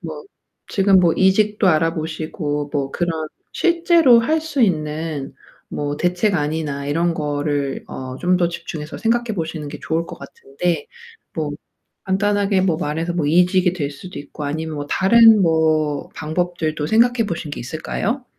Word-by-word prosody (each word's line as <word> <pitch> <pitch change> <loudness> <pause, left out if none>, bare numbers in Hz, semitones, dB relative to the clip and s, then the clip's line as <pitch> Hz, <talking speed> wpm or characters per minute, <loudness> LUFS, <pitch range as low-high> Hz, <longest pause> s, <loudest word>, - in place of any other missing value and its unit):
뭐 - - -7 0.5
지금 195 -2 +4
뭐 170 -2 +4
이직도 205 +2 +2
알아보시고 155 -3 -1
뭐 140 -2 -1
그런 175 -1 -1 0.4
실제로 335 -8 +4
할 315 +7 +1
수 300 -5 -1
있는 155 -5 -1 0.4
뭐 145 0 -3
대책안이나 160 -6 -1
이런 165 +4 +1
거를 145 -2 -2
어 130 0 -6
좀 180 +1 +2
더 175 -1 +2
집중해서 155 -3 -7
생각해 235 -1 0
보시는 160 -3 -4
게 150 0 -8
좋을 165 +1 -1
것 - - -9
같은데 145 +3 -4 0.5
뭐 155 -2 -2 0.5
간단하게 200 0 +1
뭐 175 -4 +1
말해서 165 +1 -2
뭐 165 -4 0
이직이 180 +3 +3
될 150 -6 -3
수도 180 +6 -9
있고 145 +1 -8
아니면 160 +2 -3
뭐 145 0 -4
다른 225 +4 +6
뭐 155 -3 +1
방법들도 155 -1 -2
생각해 230 +2 +3
보신 165 -5 -4
게 145 - -5
있을까요? 195 - -3
165 Hz, 295 characters per minute, -20 LUFS, 150-195 Hz, 0.5 s, 다른